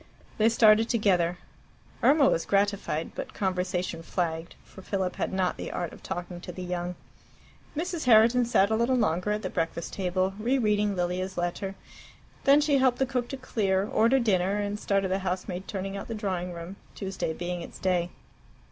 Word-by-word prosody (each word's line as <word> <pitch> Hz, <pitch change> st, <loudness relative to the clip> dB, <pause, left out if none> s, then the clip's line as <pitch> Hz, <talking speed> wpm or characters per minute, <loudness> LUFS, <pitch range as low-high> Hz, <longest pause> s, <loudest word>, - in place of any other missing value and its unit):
They 220 Hz, +1 st, +5 dB
started 225 Hz, 0 st, +5 dB
together. 180 Hz, -6 st, +2 dB, 0.6 s
Irma 285 Hz, -2 st, +5 dB
was 165 Hz, -, +1 dB
gratified; 200 Hz, -5 st, 0 dB
but -, -, -7 dB
conversation 180 Hz, -3 st, -1 dB
flagged, 165 Hz, -1 st, -3 dB
for 190 Hz, -, -14 dB
Philip 190 Hz, -1 st, -2 dB
had -, -, -1 dB
not 185 Hz, -1 st, 0 dB
the -, -, -5 dB
art 175 Hz, -, -3 dB
of -, -, -13 dB
talking 175 Hz, -1 st, -5 dB
to 180 Hz, -, -7 dB
the 185 Hz, +1 st, -7 dB
young. 180 Hz, 0 st, -3 dB, 0.8 s
Mrs. 340 Hz, -1 st, -2 dB
Herriton 235 Hz, +1 st, +6 dB
sat 200 Hz, -3 st, +3 dB
a -, -, +3 dB
little 235 Hz, +3 st, +2 dB
longer 180 Hz, -5 st, +1 dB
at 210 Hz, +1 st, -1 dB
the -, -, -2 dB
breakfast 165 Hz, 0 st, -3 dB
table, 185 Hz, 0 st, 0 dB
re 245 Hz, +5 st, +1 dB
reading 210 Hz, -3 st, +1 dB
Lilia's 180 Hz, +1 st, -2 dB
letter. 175 Hz, +3 st, -2 dB, 0.7 s
Then 280 Hz, +2 st, +6 dB
she 290 Hz, -2 st, +3 dB
helped 260 Hz, -2 st, +3 dB
the 265 Hz, -, +2 dB
cook 250 Hz, -2 st, -2 dB
to 270 Hz, -, -5 dB
clear, 200 Hz, -6 st, 0 dB
ordered 235 Hz, +4 st, +3 dB
dinner, 190 Hz, -2 st, +2 dB
and 205 Hz, 0 st, -2 dB
started 195 Hz, -2 st, 0 dB
the 190 Hz, -, +1 dB
housemaid 185 Hz, 0 st, -3 dB
turning 195 Hz, 0 st, -4 dB
out 195 Hz, -, -6 dB
the 230 Hz, -, -4 dB
drawing 185 Hz, -4 st, -2 dB
room, 175 Hz, +3 st, -8 dB, 0.2 s
Tuesday 190 Hz, -4 st, -3 dB
being 175 Hz, +1 st, -4 dB
its -, -, -9 dB
day. 180 Hz, -2 st, 0 dB
195 Hz, 180 wpm, -27 LUFS, 180-220 Hz, 0.8 s, Herriton